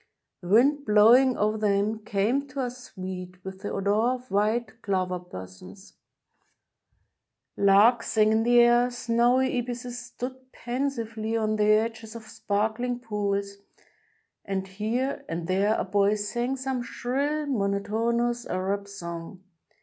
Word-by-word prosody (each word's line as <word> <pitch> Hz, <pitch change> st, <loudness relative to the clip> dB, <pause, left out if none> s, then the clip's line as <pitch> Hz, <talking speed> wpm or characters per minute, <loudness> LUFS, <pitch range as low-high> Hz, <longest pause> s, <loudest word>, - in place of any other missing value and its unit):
The 175 Hz, -, -9 dB
wind 275 Hz, +9 st, +4 dB
blowing 240 Hz, +4 st, +5 dB
over 215 Hz, +1 st, 0 dB
them 210 Hz, +1 st, +1 dB
came 225 Hz, +8 st, 0 dB
to 270 Hz, +1 st, -5 dB
us 250 Hz, 0 st, -5 dB
sweet 185 Hz, -1 st, -7 dB
with 190 Hz, 0 st, -8 dB
the 205 Hz, -, -4 dB
odor 200 Hz, +1 st, 0 dB, 0.2 s
of 250 Hz, 0 st, -13 dB
white 220 Hz, +2 st, 0 dB
clover 185 Hz, -3 st, -1 dB
blossoms: 95 Hz, -, -11 dB, 1.6 s
larks 205 Hz, +4 st, +4 dB
sang 215 Hz, -1 st, +4 dB
in 220 Hz, 0 st, +3 dB
the 240 Hz, +1 st, +5 dB
air, 240 Hz, +1 st, +4 dB
snowy 245 Hz, +2 st, +1 dB
ibises 245 Hz, 0 st, -5 dB
stood 260 Hz, +1 st, -8 dB
pensively 230 Hz, -4 st, -3 dB
on 215 Hz, -1 st, 0 dB
the 210 Hz, -, +2 dB
edges 220 Hz, +1 st, +1 dB
of 230 Hz, -, -8 dB
sparkling 220 Hz, +3 st, -2 dB
pools, 200 Hz, -3 st, -2 dB, 0.9 s
and 190 Hz, -1 st, -3 dB
here 220 Hz, +8 st, -2 dB
and 165 Hz, 0 st, -3 dB
there 195 Hz, +4 st, +2 dB
a -, -, 0 dB
boy 200 Hz, +1 st, +2 dB
sang 240 Hz, +5 st, -2 dB
some 260 Hz, -1 st, -2 dB
shrill, 270 Hz, +7 st, -2 dB
monotonous 235 Hz, +1 st, -1 dB
Arab 195 Hz, +2 st, -2 dB
song. 170 Hz, -1 st, -8 dB
220 Hz, 130 wpm, -26 LUFS, 200-245 Hz, 1.6 s, blowing